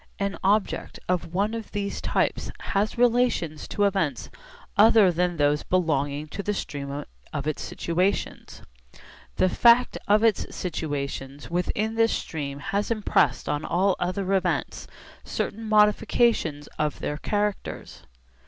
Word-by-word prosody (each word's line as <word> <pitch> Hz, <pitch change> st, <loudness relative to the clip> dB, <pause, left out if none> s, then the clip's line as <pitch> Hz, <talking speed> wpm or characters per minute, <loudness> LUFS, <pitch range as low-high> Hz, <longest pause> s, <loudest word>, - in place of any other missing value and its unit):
An 200 Hz, -1 st, -2 dB
object 200 Hz, +2 st, 0 dB
of 180 Hz, -2 st, -1 dB
one 200 Hz, +5 st, 0 dB
of 225 Hz, -1 st, -6 dB
these 200 Hz, -1 st, -3 dB
types -, -, 0 dB
has 205 Hz, +4 st, -1 dB
relations 235 Hz, -10 st, +1 dB
to 205 Hz, -, -1 dB
events 190 Hz, -8 st, 0 dB, 0.4 s
other 215 Hz, -2 st, +6 dB
than 175 Hz, 0 st, 0 dB
those 145 Hz, 0 st, +2 dB
belonging 150 Hz, -4 st, 0 dB
to 200 Hz, -, -5 dB
the 210 Hz, +1 st, -2 dB
stream 140 Hz, -3 st, -5 dB, 0.3 s
of 140 Hz, -2 st, -4 dB
its 155 Hz, -1 st, -2 dB
situations. 180 Hz, +4 st, -2 dB, 0.7 s
The -, -, +3 dB
fact 235 Hz, +6 st, +4 dB
of 210 Hz, +2 st, +4 dB
its 225 Hz, -3 st, +1 dB
situations 145 Hz, -4 st, -4 dB
within 210 Hz, +5 st, -1 dB
this 225 Hz, 0 st, +2 dB
stream 140 Hz, -3 st, -4 dB
has 195 Hz, +7 st, -2 dB
impressed 205 Hz, -, +1 dB
on 150 Hz, +1 st, -1 dB
all 190 Hz, +2 st, +2 dB
other 185 Hz, +2 st, -1 dB
events 145 Hz, -, -1 dB, 0.4 s
certain 220 Hz, +1 st, -4 dB
modifications 210 Hz, -7 st, +3 dB
of 150 Hz, -1 st, 0 dB
their 150 Hz, -, -3 dB
characters. 205 Hz, +4 st, -3 dB
185 Hz, 130 wpm, -25 LUFS, 150-210 Hz, 0.7 s, other